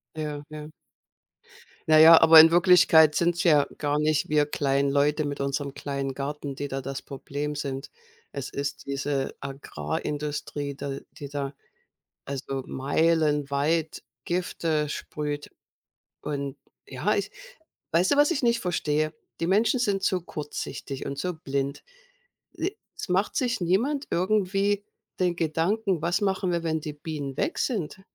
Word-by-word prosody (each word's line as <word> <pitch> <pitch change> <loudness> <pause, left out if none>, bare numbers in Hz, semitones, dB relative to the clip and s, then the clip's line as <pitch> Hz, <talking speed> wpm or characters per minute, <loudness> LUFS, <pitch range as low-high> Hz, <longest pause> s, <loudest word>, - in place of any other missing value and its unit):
Ja, 150 -2 -4
ja. 150 0 -8 1.2
Na 155 0 +7
ja, 165 +1 +9
aber 165 0 +10
in 160 +1 +10
Wirklichkeit 170 -3 +6
sind's 170 +2 +1
ja 150 -5 +5
gar 145 0 0
nicht 150 0 +1
wir 150 -1 +3
kleinen 140 -1 0
Leute 145 +2 +2
mit 145 -1 -4
unserem 140 0 -2
kleinen 140 -1 -4
Garten, 140 0 -5
die 145 0 -4
da 135 0 -3
das 135 +1 -5
Problem 145 +2 -5
sind. 140 -1 -5 0.4
Es 140 -1 -5
ist 140 +1 -4
diese 140 0 -2
Agrarindustrie, 145 - -4
de 140 -1 -5
die 145 - -8
da 140 0 -4 0.7
also 135 -1 -4
meilenweit 150 +1 +1 0.2
Gifte 165 -4 -1
sprüht. 145 -1 -5 0.7
Und, 140 -2 -4 0.3
ja, - - -1
ich - - -2 0.6
weißt 175 +3 +3
du - - +3
was 290 +2 +5
ich 300 - -1
nicht 235 -1 +2
verstehe? 155 -3 0 0.3
Die 165 - 0
Menschen 215 +7 +3
sind 200 -5 0
zu 185 -2 +1
kurzsichtig 150 -3 -6
und 140 - -5
so 180 +4 -2
blind. 140 -2 -3 0.7
E 370 +5 -3 0.2
es - - -6
macht 190 +3 +1
sich 250 -5 0
niemand 235 - +1
irgendwie 200 +2 +1 0.4
den 180 -2 +1
Gedanken: 175 +4 0
Was 170 +6 0
machen 190 -2 0
wir, 170 -1 0
wenn 160 -1 -1
die 150 -1 -6
Bienen 145 -3 -6
weg 330 - -1
sind? 190 - -2
150 Hz, 145 wpm, -26 LUFS, 140-175 Hz, 1.2 s, aber